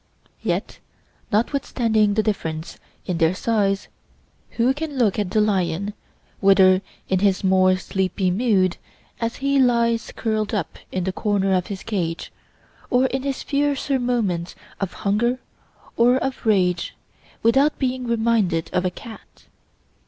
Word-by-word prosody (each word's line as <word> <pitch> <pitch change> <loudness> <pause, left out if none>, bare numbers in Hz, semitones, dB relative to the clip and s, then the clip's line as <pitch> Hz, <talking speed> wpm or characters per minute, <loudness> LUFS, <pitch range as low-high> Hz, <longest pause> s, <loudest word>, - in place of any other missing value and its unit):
Yet - - -2 0.5
notwithstanding 220 -2 +1
the 215 - +2
difference 160 -7 -3 0.3
in 175 -2 -2
their 165 +2 +3
size, 200 -2 0 0.7
who 245 +3 +3
can 295 -1 -5
look 220 -5 +2
at 205 -3 -1
the 215 - +1
lion, 200 -1 0 0.5
whether 190 -1 +5 0.3
in 190 - +1
his 195 -1 +2
more 185 -1 +4
sleepy 185 0 -1
mood, 190 -3 +2 0.4
as 230 0 -2
he 275 +1 +1
lies 235 -3 +2
curled 215 -1 -1
up 190 -6 -3
in 185 - -2
the 190 +1 -2
corner 195 -1 +1
of 180 -1 +1
his 195 -2 -6
cage, 175 -7 -3 0.6
or 250 +1 +3
in 265 0 -1
his 275 0 -3
fiercer 280 -1 0
moments 210 -9 -1 0.2
of 195 -2 -2
hunger 235 +5 +2 0.6
or 245 +2 +4
of 265 -2 -3
rage, 180 -5 +1 0.5
without 270 +6 +3
being 255 -2 -2
reminded 220 -8 +1
of 180 0 +1
a - - +2
cat? 220 +5 -13
210 Hz, 140 wpm, -22 LUFS, 185-240 Hz, 0.7 s, whether